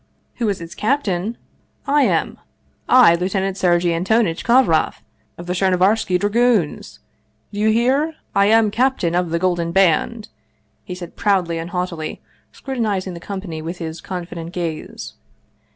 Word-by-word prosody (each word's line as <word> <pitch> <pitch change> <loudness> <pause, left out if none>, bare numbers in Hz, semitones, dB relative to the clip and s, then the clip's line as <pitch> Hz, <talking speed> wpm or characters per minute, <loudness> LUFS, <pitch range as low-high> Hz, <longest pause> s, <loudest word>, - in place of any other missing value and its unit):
" - - -44
Who 230 -3 0
is 200 - -2
its 165 0 -8
captain? 215 -4 -1 0.5
I 290 +1 +3
am - - 0 0.5
I, 250 -10 +7
Lieutenant 190 +2 -1
Sergei 175 -2 +2
An 165 +1 -1
tonitch 205 -4 +1
Kovroff, 235 -10 +2 0.3
of 175 - -8
the 180 - -2
Chernovarski 185 +1 +2
Dragoons! 205 -4 +1 0.6
Do 205 - -5
you 215 +1 +3
hear? 265 +8 +1 0.2
I 200 0 +4
am 220 -1 +4
captain 245 -8 +1
of 175 -1 0
the 165 - 0
Golden 175 -1 0
Band," 195 +5 +1 0.5
he 180 - -7
said 175 -2 -9
proudly 180 -5 +1
and 165 +1 -6
haughtily, 175 -3 -4 0.3
scrutinizing 210 -8 -3
the 170 - -8
company 185 -3 -6
with 170 +3 -6
his 165 -1 -6
confident 175 -2 -6
gaze. 165 -3 -5
185 Hz, 150 wpm, -20 LUFS, 170-220 Hz, 0.6 s, I